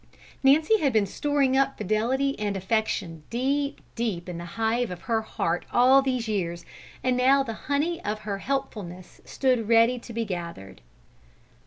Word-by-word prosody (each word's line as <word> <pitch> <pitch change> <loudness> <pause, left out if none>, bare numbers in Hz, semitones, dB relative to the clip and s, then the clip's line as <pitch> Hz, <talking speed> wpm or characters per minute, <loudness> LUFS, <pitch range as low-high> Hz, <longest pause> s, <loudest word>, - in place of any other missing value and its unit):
Nancy 310 +11 +4
had 280 -6 +1
been 215 -2 +3
storing 275 +4 +1
up 275 0 +2
fidelity 235 +7 0
and 205 -2 -1
affection 190 -4 -1
deep, 280 +4 -1
deep 210 -7 -3
in 175 -2 -5
the 170 - -6
hive 225 +2 +1
of 180 -1 -7
her 225 -2 0
heart 175 -5 -2
all 260 +3 +6
these 255 -4 -1
years, 170 -5 -2 0.4
and 255 -1 +2
now 265 +2 +4
the 230 -4 -5 0.2
honey 330 +5 0
of 215 +1 -3
her 200 -2 -4
helpfulness 200 -10 -5
stood 250 -5 0
ready 230 +2 +5
to 235 - -11
be 230 0 -2
gathered. 170 - -7
230 Hz, 160 wpm, -26 LUFS, 200-270 Hz, 0.4 s, all